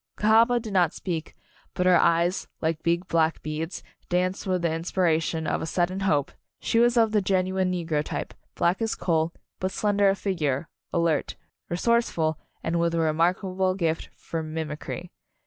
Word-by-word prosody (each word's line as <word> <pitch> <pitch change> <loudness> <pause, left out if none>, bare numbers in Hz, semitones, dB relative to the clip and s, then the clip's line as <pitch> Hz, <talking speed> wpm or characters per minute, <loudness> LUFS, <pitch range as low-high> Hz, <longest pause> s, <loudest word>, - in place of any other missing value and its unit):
Cahaba 225 +3 +4
did 220 -3 -7
not 175 -4 +3
speak, 165 -4 -4 0.4
but 180 -1 0
her 185 -1 +6
eyes, 170 +2 +2
like 160 -1 -1
big 170 +2 0
black 165 -2 +1
beads, 155 +3 -4 0.3
danced 185 +3 0
with 185 -2 0
the 165 -2 +1
in 165 - -2
spiration 165 -2 0
of - - 0
a - - -3
sudden 180 +3 0
hope. 150 -8 +1 0.3
She 230 - +1
was 240 +1 +4
of 225 -2 +4
the 210 -1 +3
genuine 185 -1 +1
negro 165 -4 -1
type, - - -5 0.2
black 175 +5 +1
as 225 -1 0
a - - -20
coal, 160 -1 +1 0.3
but 185 - 0
slender 205 0 +2
of 195 - +1
figure, 160 -7 -1 0.2
alert, 170 -4 0 0.3
resourceful 175 -5 +1 0.2
and 170 +1 0
with 170 0 +1
a - - +1
remarkable 185 +4 +1
gift 165 -4 -1
for 165 - -5
mimicry. 160 +2 -5
175 Hz, 170 wpm, -26 LUFS, 160-190 Hz, 0.4 s, her